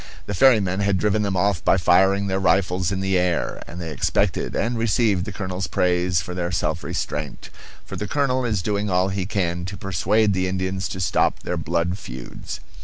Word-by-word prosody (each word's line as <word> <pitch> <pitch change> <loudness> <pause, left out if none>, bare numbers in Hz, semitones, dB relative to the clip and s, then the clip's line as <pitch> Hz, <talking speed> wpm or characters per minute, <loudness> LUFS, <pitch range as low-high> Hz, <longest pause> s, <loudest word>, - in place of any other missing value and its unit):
The 105 - -4
ferrymen 100 -4 +4
had 100 -1 +2
driven 105 +2 +1
them 100 -2 -1
off 95 -2 +1
by - - +4
firing 95 +3 +4
their 95 0 0
rifles 90 -1 +2
in 95 -1 -2
the 95 -1 +1
air; 90 -1 -1
and 85 - -8
they 80 -2 -5
expected 75 - 0
and 120 +1 0
received 110 -4 +1
the 105 - -5
colonel's 95 -2 -4
praise 90 -1 +1
for 90 - -6
their 90 -1 -2
self 80 -1 -1
restraint; 75 -1 -4 0.3
for - - -7
the 105 - -4
colonel 130 +1 +1
is 105 -6 -1
doing 105 0 -1
all 90 +1 +2
he 95 -1 -2
can 90 -4 -1
to 95 +2 -6
persuade 100 +3 +1
the 95 0 0
Indians 95 0 -2
to 95 - -5
stop 90 - +1
their 90 - -2
blood 85 +3 -1
feuds. - - -8
95 Hz, 195 wpm, -23 LUFS, 90-100 Hz, 0.3 s, ferrymen